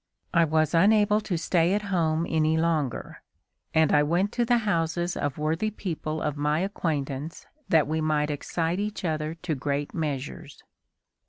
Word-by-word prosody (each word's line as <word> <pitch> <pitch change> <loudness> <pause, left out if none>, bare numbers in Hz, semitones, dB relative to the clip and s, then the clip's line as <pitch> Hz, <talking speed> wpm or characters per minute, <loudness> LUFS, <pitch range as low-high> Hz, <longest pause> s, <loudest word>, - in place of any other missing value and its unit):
I 170 -2 +5
was 155 +1 +1
unable 210 +4 +4
to 185 -5 -2
stay 170 +2 +2
at 210 - -1
home 165 -2 +1
any 160 0 +2
longer, 160 -6 -1 0.5
and 160 -1 +3
I 145 - +6
went 175 +7 +1
to 240 - 0
the 240 +1 +3
houses 170 -2 0
of 145 -2 -2
worthy 160 +7 0
people 160 -6 -4
of 150 -2 -1
my 150 +2 +1
acquaintance 155 -6 -3 0.2
that 160 -3 +4
we 160 +1 -1
might 150 -1 +1
excite 165 +4 -2
each 210 -2 -3
other 155 -1 -2
to 170 0 -3
great 140 +1 -2
measures." 145 -3 -5
160 Hz, 160 wpm, -26 LUFS, 150-175 Hz, 0.5 s, I